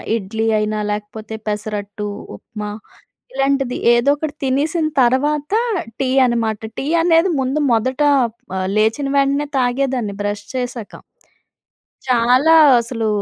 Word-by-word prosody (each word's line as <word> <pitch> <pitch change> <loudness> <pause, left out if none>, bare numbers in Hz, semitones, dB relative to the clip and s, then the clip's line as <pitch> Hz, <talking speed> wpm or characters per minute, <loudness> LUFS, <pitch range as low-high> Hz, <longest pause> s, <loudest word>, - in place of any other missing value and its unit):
ఇడ్లీ 220 +1 -3
అయినా 215 0 -1
లేకపోతే, 215 +1 -6
పెసరట్టు, 210 0 -4 0.3
ఉప్మా, 210 - -8 0.6
ఇలాంటిది 270 -1 0 0.2
ఏదో 240 +4 +3
ఒకటి 300 0 -4
తినేసిన 310 +5 0
తర్వాత, 285 +5 +1 0.5
టీ 265 -1 0 0.2
అన్నమాట. 225 -3 -1 0.2
టీ - - -4 0.2
అనేది 340 +2 +3
ముందు 265 +3 -1
మొదట 255 +5 0 0.6
ఆహ్, 185 0 -2
లేచిన 220 +6 +1
వెంటనే 280 +1 +1
తాగేదాన్ని, 250 -4 -1
బ్రష్ 205 0 -3
చేశాక... 245 -4 -5 1.0
చాలా 250 +4 +3 0.3
అసలు 230 -1 -3
245 Hz, 110 wpm, -18 LUFS, 215-275 Hz, 1.0 s, ఏదో